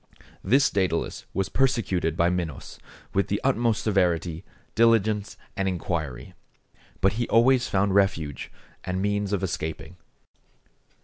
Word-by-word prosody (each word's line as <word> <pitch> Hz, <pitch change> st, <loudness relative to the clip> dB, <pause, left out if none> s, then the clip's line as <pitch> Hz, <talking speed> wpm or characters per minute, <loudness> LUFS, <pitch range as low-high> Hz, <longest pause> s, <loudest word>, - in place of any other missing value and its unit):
This 140 Hz, +4 st, +3 dB
Dædalus 90 Hz, -4 st, -1 dB
was 95 Hz, -1 st, -1 dB
persecuted 95 Hz, -, 0 dB
by 85 Hz, +1 st, +3 dB
Minos 85 Hz, -6 st, -5 dB, 0.3 s
with 100 Hz, -, +1 dB
the 100 Hz, -, -1 dB
utmost 120 Hz, -5 st, +1 dB
severity, 90 Hz, -4 st, 0 dB, 0.3 s
diligence, 110 Hz, -3 st, +2 dB, 0.2 s
and 95 Hz, 0 st, -1 dB
inquiry; 80 Hz, -8 st, -3 dB, 0.7 s
but 95 Hz, +1 st, +3 dB
he 120 Hz, +2 st, -2 dB
always 120 Hz, +2 st, +4 dB
found 100 Hz, 0 st, +1 dB
refuge 95 Hz, -7 st, 0 dB, 0.3 s
and 90 Hz, 0 st, -3 dB
means 100 Hz, 0 st, -1 dB
of 100 Hz, -2 st, -1 dB
escaping. 80 Hz, -1 st, -4 dB
95 Hz, 120 wpm, -25 LUFS, 85-110 Hz, 0.7 s, always